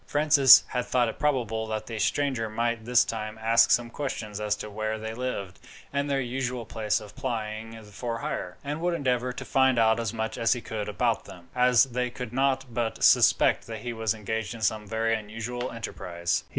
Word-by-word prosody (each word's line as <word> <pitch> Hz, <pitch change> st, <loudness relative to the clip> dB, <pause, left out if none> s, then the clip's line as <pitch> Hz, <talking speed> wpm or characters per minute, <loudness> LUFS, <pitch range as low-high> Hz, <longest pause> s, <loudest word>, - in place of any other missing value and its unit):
Francis 145 Hz, -7 st, +7 dB
had 125 Hz, -1 st, -1 dB
thought 125 Hz, -1 st, +2 dB
it 115 Hz, -, -6 dB
probable 115 Hz, -7 st, 0 dB
that 110 Hz, -1 st, -3 dB
the 115 Hz, -2 st, -6 dB
stranger 130 Hz, -3 st, 0 dB
might 115 Hz, 0 st, -2 dB
this 120 Hz, 0 st, +4 dB
time 110 Hz, -1 st, -5 dB
ask 115 Hz, +1 st, +4 dB
some 120 Hz, -1 st, +2 dB
questions 110 Hz, -8 st, -4 dB
as 105 Hz, -1 st, 0 dB
to 105 Hz, -, -7 dB
where 110 Hz, +1 st, -3 dB
they 110 Hz, +1 st, -5 dB
lived 115 Hz, -6 st, -4 dB, 0.3 s
and 140 Hz, +1 st, -1 dB
their 140 Hz, -1 st, +1 dB
usual 125 Hz, -1 st, -3 dB
place 105 Hz, -1 st, -1 dB
of 105 Hz, -1 st, -12 dB
plying 115 Hz, -3 st, -5 dB
for 115 Hz, +3 st, -5 dB
hire, 90 Hz, -5 st, -4 dB
and 145 Hz, +3 st, -4 dB
would 175 Hz, 0 st, 0 dB
endeavour 125 Hz, -4 st, 0 dB
to 125 Hz, -, -7 dB
find 130 Hz, -2 st, +3 dB
out 110 Hz, 0 st, +4 dB
as 115 Hz, -3 st, -2 dB
much 110 Hz, -1 st, -4 dB
as 115 Hz, +1 st, +3 dB
he 125 Hz, -, -4 dB
could 105 Hz, -2 st, -5 dB
about 100 Hz, -, 0 dB
them, 85 Hz, -1 st, -13 dB
as 125 Hz, -1 st, +5 dB
they 125 Hz, -1 st, -2 dB
could 125 Hz, -1 st, -7 dB
not 135 Hz, 0 st, +1 dB
but 115 Hz, -1 st, -2 dB
suspect -, -, +4 dB
that 115 Hz, -1 st, -6 dB
he 120 Hz, -1 st, -4 dB
was 110 Hz, -1 st, -1 dB
engaged 110 Hz, +1 st, -4 dB
in 115 Hz, -, -10 dB
some 105 Hz, 0 st, 0 dB
very 115 Hz, +1 st, 0 dB
unusual 115 Hz, +3 st, -4 dB
enterprise. 85 Hz, -6 st, -3 dB
115 Hz, 200 wpm, -27 LUFS, 110-125 Hz, 0.3 s, Francis